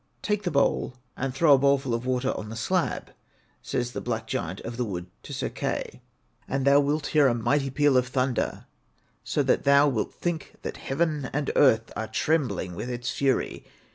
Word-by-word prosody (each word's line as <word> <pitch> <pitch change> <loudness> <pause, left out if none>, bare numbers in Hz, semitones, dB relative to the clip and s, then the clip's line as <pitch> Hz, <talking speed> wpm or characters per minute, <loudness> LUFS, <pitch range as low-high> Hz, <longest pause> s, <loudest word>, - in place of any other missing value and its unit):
Take 210 -1 0
the 180 - -1
bowl 140 -4 +1 0.2
and 135 0 -2
throw 145 +3 +5
a 135 - +6
bowlful 140 -2 +2
of 115 +2 -2
water 130 +1 +1
on 105 - -6
the 115 - -6
slab,' 175 +10 -1 0.5
says 120 -1 -2
the - - -5
black 115 -2 -3
giant 90 -3 -3
of 115 +1 -6
the 125 - -1
wood 90 -6 -4 0.2
to - - -11
Sir - - -2
Kai, - - -4 0.5
'and 135 0 -1
thou 140 +1 +6
wilt 145 +1 0
hear 150 -3 +6
a 120 - +2
mighty 135 +4 +1
peal 145 +1 +3
of 125 0 +2
thunder, 130 -1 -1 0.6
so - - 0
that - - +2
thou 140 +1 +6
wilt 125 -6 -1
think 170 -4 -3
that - - -5
heaven 150 -1 -1
and 145 0 -1
earth 115 -5 +4
are 110 - -3
trembling 125 - 0
with 120 - -5
its 125 0 -3
fury. 135 -2 0
135 Hz, 195 wpm, -26 LUFS, 120-145 Hz, 0.6 s, a